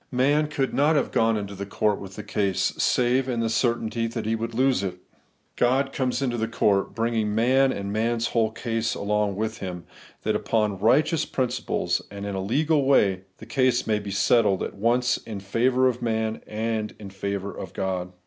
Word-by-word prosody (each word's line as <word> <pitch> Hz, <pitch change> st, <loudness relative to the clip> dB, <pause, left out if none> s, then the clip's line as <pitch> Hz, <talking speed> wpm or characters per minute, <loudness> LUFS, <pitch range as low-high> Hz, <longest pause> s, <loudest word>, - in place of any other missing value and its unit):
Man 145 Hz, +4 st, +2 dB
could 140 Hz, -3 st, -2 dB
not 150 Hz, +3 st, +3 dB
have 140 Hz, -, +1 dB
gone 115 Hz, -1 st, +2 dB
into 100 Hz, -1 st, -5 dB
court 100 Hz, +1 st, 0 dB
with 95 Hz, -1 st, -9 dB
the 105 Hz, -, -7 dB
case, 100 Hz, -2 st, 0 dB
save 125 Hz, +1 st, +2 dB
in 120 Hz, -2 st, -1 dB
the 115 Hz, -1 st, 0 dB
certainty 115 Hz, -1 st, 0 dB
that 115 Hz, -1 st, -4 dB
he 110 Hz, +1 st, +1 dB
would 115 Hz, +1 st, -4 dB
lose 130 Hz, -1 st, +2 dB
it. 95 Hz, -2 st, -3 dB, 0.6 s
God 135 Hz, +3 st, +2 dB
comes 130 Hz, +1 st, -1 dB
into 120 Hz, -3 st, -1 dB
court, 100 Hz, -3 st, +1 dB
bringing 115 Hz, -2 st, 0 dB
man 130 Hz, +4 st, +4 dB
and 100 Hz, -2 st, -4 dB
man's 115 Hz, +1 st, 0 dB
whole 115 Hz, -2 st, +2 dB
case 115 Hz, 0 st, -2 dB
along 105 Hz, -1 st, 0 dB
with 110 Hz, +2 st, -3 dB
Him, 90 Hz, -2 st, -6 dB, 0.4 s
that -, -, 0 dB
upon 105 Hz, -4 st, 0 dB
righteous 150 Hz, -, +3 dB
principles, 125 Hz, -1 st, -1 dB
and 100 Hz, 0 st, -7 dB
in 100 Hz, -, -3 dB
a 95 Hz, -, -2 dB
legal 145 Hz, +9 st, +1 dB
way, 100 Hz, -9 st, +3 dB
the 110 Hz, -, -11 dB
case 130 Hz, +1 st, +1 dB
may 105 Hz, -1 st, +1 dB
be 105 Hz, -1 st, -7 dB
settled, 100 Hz, 0 st, +3 dB
at -, -, -4 dB
once 120 Hz, +4 st, +1 dB
in 105 Hz, -3 st, -7 dB
favour 125 Hz, +6 st, +2 dB
of 125 Hz, -1 st, -1 dB
man 110 Hz, -1 st, -1 dB
and 110 Hz, 0 st, -2 dB
in 100 Hz, -2 st, -9 dB
favour 100 Hz, +1 st, -4 dB
of 95 Hz, -, -7 dB
God. 95 Hz, -2 st, -3 dB
115 Hz, 185 wpm, -25 LUFS, 100-125 Hz, 0.6 s, man